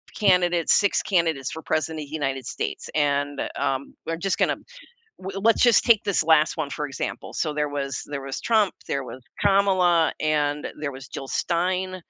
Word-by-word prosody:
candidates, 180 Hz, -4 st, +3 dB
6 200 Hz, -1 st, +3 dB
candidates 165 Hz, -8 st, 0 dB
for 160 Hz, -, -7 dB
President 155 Hz, 0 st, -1 dB
of 140 Hz, -, -12 dB
the -, -, -12 dB
United 135 Hz, -4 st, -2 dB
States -, -, -4 dB
and, 145 Hz, -1 st, 0 dB
um, 135 Hz, +1 st, -2 dB
we're 165 Hz, -, -2 dB
just 195 Hz, +2 st, -1 dB
gonna -, -, +1 dB, 0.6 s
w 195 Hz, +1 st, -5 dB
let's 225 Hz, +2 st, +3 dB
just 240 Hz, -3 st, +5 dB
take 230 Hz, -4 st, +5 dB
this 200 Hz, -5 st, +1 dB
last 160 Hz, 0 st, +3 dB
one 150 Hz, -3 st, -2 dB
for 150 Hz, +1 st, -3 dB
example. 135 Hz, -, -5 dB
So, 155 Hz, -2 st, -1 dB
there 150 Hz, 0 st, -1 dB
was 140 Hz, -2 st, -3 dB
there 145 Hz, -2 st, -5 dB
was 135 Hz, 0 st, -5 dB
Trump, 215 Hz, -4 st, +2 dB, 0.2 s
there 140 Hz, -2 st, -1 dB
was 125 Hz, 0 st, -10 dB, 0.2 s
Kamala, 185 Hz, -4 st, +3 dB
and 150 Hz, -1 st, 0 dB
there 140 Hz, -, -2 dB
was 130 Hz, -1 st, -10 dB
Jill 135 Hz, -, -7 dB
Stein. 185 Hz, +2 st, -1 dB
155 Hz, 185 wpm, -24 LUFS, 145-185 Hz, 0.6 s, just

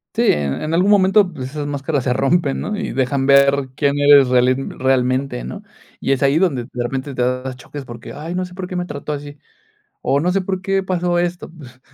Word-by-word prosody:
Sí, -, -, +2 dB
en 70 Hz, -2 st, -1 dB
en 155 Hz, +1 st, -3 dB
algún 180 Hz, +4 st, +3 dB
momento, 195 Hz, -1 st, +4 dB
pues, 130 Hz, -5 st, -7 dB
esas 150 Hz, -1 st, -4 dB
máscaras 145 Hz, -1 st, -2 dB
se 125 Hz, -, +1 dB
rompen, 140 Hz, +2 st, +1 dB
¿no? 210 Hz, -, -3 dB
Y -, -, -3 dB
dejan 135 Hz, +1 st, 0 dB
ver 140 Hz, -1 st, +4 dB
quién 140 Hz, 0 st, +1 dB
eres 145 Hz, -2 st, +6 dB
reali 125 Hz, 0 st, +3 dB
realmente, 130 Hz, -1 st, -1 dB
¿no? 205 Hz, -, -7 dB, 0.4 s
Y -, -, -1 dB
es 135 Hz, 0 st, +1 dB
ahí 140 Hz, +3 st, +3 dB
donde, 155 Hz, -10 st, +1 dB
de 125 Hz, -, -3 dB
repente, 135 Hz, +3 st, -4 dB
te 125 Hz, -, -3 dB
das 125 Hz, +1 st, -1 dB
choques 135 Hz, +3 st, -9 dB
porque: 120 Hz, -2 st, -9 dB
"Ay, 160 Hz, +4 st, -6 dB
no 185 Hz, 0 st, -2 dB
sé 180 Hz, -, -12 dB
por 185 Hz, -1 st, -5 dB
qué 185 Hz, -, -6 dB
me 180 Hz, 0 st, -2 dB
trató 150 Hz, -2 st, -5 dB
así. 145 Hz, 0 st, -7 dB, 0.6 s
O 140 Hz, -, +1 dB
no 175 Hz, +4 st, +1 dB
sé 195 Hz, +2 st, +1 dB
por 190 Hz, 0 st, -3 dB
qué 195 Hz, 0 st, 0 dB
pasó 175 Hz, -2 st, 0 dB
esto". 175 Hz, 0 st, -2 dB
Pues 130 Hz, -6 st, -14 dB
140 Hz, 225 wpm, -19 LUFS, 130-175 Hz, 0.6 s, eres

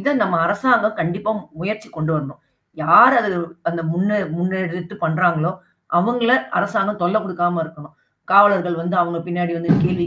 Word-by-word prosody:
இத 285 Hz, -, 0 dB
நம்ம 190 Hz, -3 st, 0 dB
அரசாங்கம் 215 Hz, +1 st, +1 dB
கண்டிப்பா 190 Hz, +6 st, -2 dB, 0.3 s
முயற்சி 215 Hz, +4 st, -5 dB
கொண்டு 155 Hz, +1 st, -2 dB
வரணும். 145 Hz, -2 st, -5 dB, 0.4 s
யார் 245 Hz, -, +7 dB
அது 205 Hz, -5 st, -2 dB, 0.3 s
அந்த 170 Hz, 0 st, -4 dB
முன்ன 185 Hz, +4 st, -1 dB, 0.3 s
முன்னெடுத்து 180 Hz, 0 st, -4 dB
பண்றாங்களோ! 170 Hz, +1 st, +1 dB, 0.5 s
அவுங்கள 235 Hz, +5 st, +1 dB, 0.3 s
அரசாங்கம் 200 Hz, 0 st, -1 dB
தொல்ல 175 Hz, +5 st, +1 dB
குடுக்காம 175 Hz, -3 st, -1 dB
இருக்கணும். 155 Hz, -2 st, -14 dB, 0.4 s
காவலர்கள் 195 Hz, -3 st, +4 dB
வந்து 175 Hz, +3 st, -3 dB
அவுங்க 170 Hz, -1 st, -1 dB
பின்னாடி 175 Hz, 0 st, -2 dB
வந்து 170 Hz, 0 st, -3 dB
கேள்வி 175 Hz, 0 st, 0 dB
180 Hz, 145 wpm, -19 LUFS, 170-205 Hz, 0.5 s, யார்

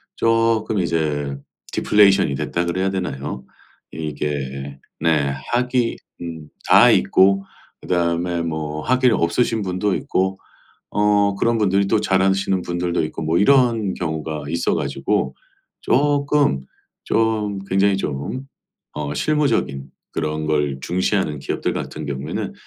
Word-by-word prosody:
쪼끔 115 Hz, -2 st, +2 dB
이제 75 Hz, -5 st, -1 dB, 0.4 s
"디플레이션이 100 Hz, -8 st, +4 dB
됐다." 85 Hz, +6 st, -2 dB
그래야 95 Hz, +3 st, 0 dB
되나요? 70 Hz, -8 st, -4 dB, 0.5 s
이게 70 Hz, -3 st, -4 dB, 0.2 s
네 75 Hz, -3 st, +2 dB, 0.2 s
학위 125 Hz, 0 st, +1 dB, 0.2 s
음 80 Hz, -3 st, -7 dB, 0.2 s
다 -, -, +7 dB
있고 95 Hz, +9 st, +4 dB, 0.4 s
그다음에 85 Hz, 0 st, 0 dB
뭐 75 Hz, -2 st, -3 dB
학위를 130 Hz, -2 st, +3 dB
없으신 110 Hz, +7 st, +1 dB
분도 95 Hz, +1 st, 0 dB
있고 95 Hz, +1 st, -1 dB, 0.5 s
어 105 Hz, -1 st, +2 dB
그런 115 Hz, +3 st, +1 dB
분들이 100 Hz, -1 st, +2 dB
또 105 Hz, -, +2 dB
잘하시는 95 Hz, -1 st, +2 dB
분들도 85 Hz, 0 st, -1 dB
있고 75 Hz, -, -6 dB
뭐 80 Hz, +2 st, +1 dB
이런 115 Hz, -3 st, +3 dB
경우가 80 Hz, -3 st, -4 dB
있어 85 Hz, +2 st, 0 dB
가지고 -, -, -1 dB, 0.5 s
쪼끔 145 Hz, -, +2 dB, 0.4 s
좀 110 Hz, -3 st, 0 dB
굉장히 95 Hz, +1 st, +2 dB
좀 95 Hz, -, -4 dB, 0.5 s
어 75 Hz, -1 st, -4 dB
실무적인 115 Hz, -, 0 dB, 0.2 s
그런 75 Hz, -1 st, -2 dB
걸 75 Hz, -3 st, 0 dB
중시하는 90 Hz, -3 st, 0 dB
기업들 -, -, -2 dB
같은 75 Hz, 0 st, -5 dB
경우에는 70 Hz, +1 st, -4 dB
90 Hz, 255 characters per minute, -21 LUFS, 75-105 Hz, 0.5 s, 다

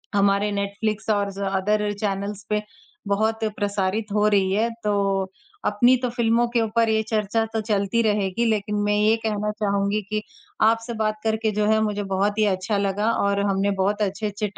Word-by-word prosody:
हमारे 200 Hz, +1 st, +2 dB
नेटफ्लिक्स 205 Hz, +2 st, -2 dB
और 200 Hz, -1 st, +1 dB
ज़ 195 Hz, -, -9 dB, 0.2 s
अदर 210 Hz, +1 st, 0 dB
चैनल्स 200 Hz, 0 st, -2 dB
पे 210 Hz, 0 st, +1 dB, 0.5 s
बहुत 220 Hz, +2 st, 0 dB
प्रसारित 205 Hz, +1 st, -1 dB
हो 210 Hz, 0 st, +3 dB
रही 195 Hz, -2 st, +2 dB
है। 225 Hz, +3 st, +2 dB
तो 210 Hz, -, +1 dB, 0.7 s
अपनी 240 Hz, +5 st, +4 dB
तो 250 Hz, -, +1 dB
फ़िल्मों 235 Hz, 0 st, +2 dB
के 230 Hz, -, +4 dB
ऊपर 225 Hz, +1 st, +1 dB
ये 220 Hz, 0 st, +2 dB
चर्चा 220 Hz, +1 st, 0 dB
तो 220 Hz, -, 0 dB
चलती 210 Hz, +1 st, 0 dB
रहेगी, 210 Hz, 0 st, 0 dB
लेकिन 210 Hz, -2 st, 0 dB
मैं 205 Hz, 0 st, +2 dB
ये 215 Hz, +2 st, +4 dB
कहना 210 Hz, -1 st, -1 dB
चाहूँगी 200 Hz, 0 st, 0 dB
कि 215 Hz, 0 st, -1 dB, 0.5 s
आपसे 230 Hz, +1 st, 0 dB
बात 215 Hz, 0 st, -1 dB
करके 220 Hz, 0 st, 0 dB
जो 210 Hz, -, +2 dB
है, 220 Hz, -, +3 dB
मुझे 205 Hz, -1 st, -1 dB
बहुत 200 Hz, +2 st, 0 dB
ही 215 Hz, -, +4 dB
अच्छा 190 Hz, +3 st, -2 dB
लगा 200 Hz, +3 st, 0 dB
और 200 Hz, -2 st, +1 dB
हमने 200 Hz, 0 st, +1 dB
बहुत 205 Hz, +2 st, 0 dB
अच्छे-अच्छे 205 Hz, 0 st, -2 dB
210 Hz, 175 wpm, -23 LUFS, 200-220 Hz, 0.7 s, अपनी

